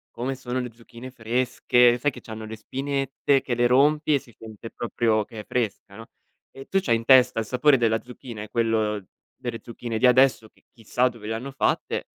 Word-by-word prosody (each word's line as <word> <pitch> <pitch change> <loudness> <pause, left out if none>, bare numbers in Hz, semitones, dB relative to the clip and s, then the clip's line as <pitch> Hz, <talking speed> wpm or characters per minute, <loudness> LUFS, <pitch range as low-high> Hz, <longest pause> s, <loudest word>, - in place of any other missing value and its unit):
come 130 +3 -3
sono 130 0 -4
le 125 -2 -4
zucchine 120 +2 -12
fresche, 120 0 +2
sai 145 +4 +1
che - - -11
c'hanno 110 -1 -8
le 110 - -7
spinette 135 +3 -1
che 125 - -3
le 120 0 +3
rompi 150 +4 +3
e 140 - +3
si 125 -4 -19
sente 110 0 -10
proprio 110 -2 0
che 110 0 -9
è - - -16
fresca, 105 -4 -3
no, 115 - -10 0.5
e 135 - -11
tu 195 - +1
c'hai 115 - +2
in 115 - -3
testa 130 -2 +5
il 110 - -2
sapore 135 +4 +3
della 115 -2 +1
zucchina 120 -3 -10
e 105 - -7
quello 110 -3 0 0.3
delle 120 -3 -5
zucchine 120 -1 -6
di 125 - +5
adesso 125 -3 +4
che - - -31
chissà 125 +2 0
dove 115 -3 -11
le 110 - -2
hanno 125 +5 -5
fatte, 135 - -1
120 Hz, 205 wpm, -24 LUFS, 115-130 Hz, 0.5 s, testa